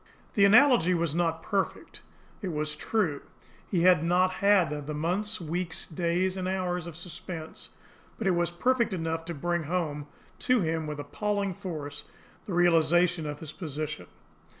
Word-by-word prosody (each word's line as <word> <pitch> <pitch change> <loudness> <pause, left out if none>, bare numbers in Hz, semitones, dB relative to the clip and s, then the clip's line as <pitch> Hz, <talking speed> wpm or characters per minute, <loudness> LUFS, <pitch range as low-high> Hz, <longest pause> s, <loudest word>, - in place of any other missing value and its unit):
The 200 - +5
analogy 225 - +6
was 165 -3 0
not 165 -1 0
perfect, 200 -3 -2 0.4
it 200 - -3
was 150 -2 -2
true, 175 -10 -1 0.5
he 180 -4 +1
had 180 -4 +6
not 180 +2 +3
had 180 -8 +2
the 155 - -3
months, 195 +8 -1
weeks, 170 +1 -3
days 175 +3 0
and 185 -1 -2
hours 180 -2 -1
of 170 - -8
suspense; 170 -1 -7 0.5
but 225 - -4
it 190 - +4
was 175 -1 +1
perfect 235 +5 +1
enough 165 -2 -2
to 170 0 -5
bring 175 +4 -1
home 150 -3 -2 0.3
to 250 -3 +2
him 160 -2 -1
with 150 -1 -5
appalling 200 +6 -2
force 150 -6 -6 0.4
the 195 - -3
realisation 175 -1 +3
of 145 0 -6
his 155 -2 -7
position. 155 - -5
175 Hz, 155 wpm, -28 LUFS, 160-185 Hz, 0.5 s, analogy